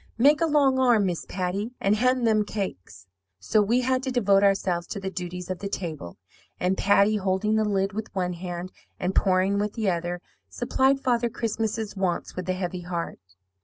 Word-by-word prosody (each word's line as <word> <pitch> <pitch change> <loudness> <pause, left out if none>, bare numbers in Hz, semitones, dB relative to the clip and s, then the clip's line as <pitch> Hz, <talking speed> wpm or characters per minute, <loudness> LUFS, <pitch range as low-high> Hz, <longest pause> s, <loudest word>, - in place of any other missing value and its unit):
Make 290 +7 +5
a 330 - +3
long 280 -4 +3
arm, 240 -5 +4
Miss 175 -3 -3
Patty, 195 +6 -3
and 200 +2 +2
hand 250 +2 +2
them 215 -2 +3
cakes.' 95 - -6 0.3
"So 155 - +2
we 235 +5 +2
had 255 0 +1
to 265 -1 -3
devote 200 -6 +3
ourselves 190 -3 +1
to 205 - -5
the 190 -1 -4
duties 180 0 -5
of 185 - -4
the 200 - -4
table; 155 - -5 0.4
and 185 +1 +1
Patty, 200 +2 +3
holding 195 +2 0
the 220 - +3
lid 195 -1 0
with 220 +1 -4
one 180 -1 -1
hand 175 +1 -6 0.3
and 180 +1 -1
pouring 190 +1 +2
with 210 0 -1
the 215 -5 0
other, 175 +1 -3 0.3
supplied 265 - +1
Father 240 -2 +1
Christmas's 220 -1 -2
wants 190 -3 -2
with 185 0 -5
a - - +2
heavy 180 -1 -4
heart. 170 -1 -4
195 Hz, 190 wpm, -26 LUFS, 180-225 Hz, 0.4 s, Make